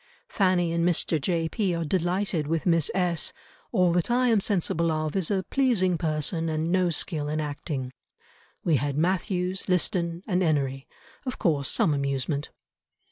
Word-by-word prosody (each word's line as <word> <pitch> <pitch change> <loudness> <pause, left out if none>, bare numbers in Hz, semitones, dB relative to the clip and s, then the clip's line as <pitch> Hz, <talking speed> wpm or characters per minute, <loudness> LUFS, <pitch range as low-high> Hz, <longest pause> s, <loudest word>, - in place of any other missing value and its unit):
Fanny 185 -4 +2
and 170 0 0
Mr. 170 -2 +1
J. 165 0 0
P. 190 -1 -1
are 165 -1 -2
delighted 175 -1 0
with 165 0 -1
Miss 165 -4 +3
S—— 175 -4 0 0.4
all 180 -6 +3
that 175 +3 +1
I 250 +1 +3
am 225 -3 +4
sensible 170 -4 +1
of... 155 -1 -2
is 190 -4 +1
a 195 -2 0
pleasing 225 -10 +2
person 160 +1 -1
and 160 +1 -1
no 185 -1 +3
skill 155 -2 -1
in 155 +1 -1
acting. 145 -3 -4 0.7
We 160 -4 +3
had 140 +2 -2
Mathews, 185 +2 0
Liston, 175 -1 0
and 185 -3 0
Enery; 140 -5 0 0.4
of 255 - -3
course 145 -5 +1
some 155 - +2
amusement." 140 +1 -2
170 Hz, 160 wpm, -26 LUFS, 155-185 Hz, 0.7 s, am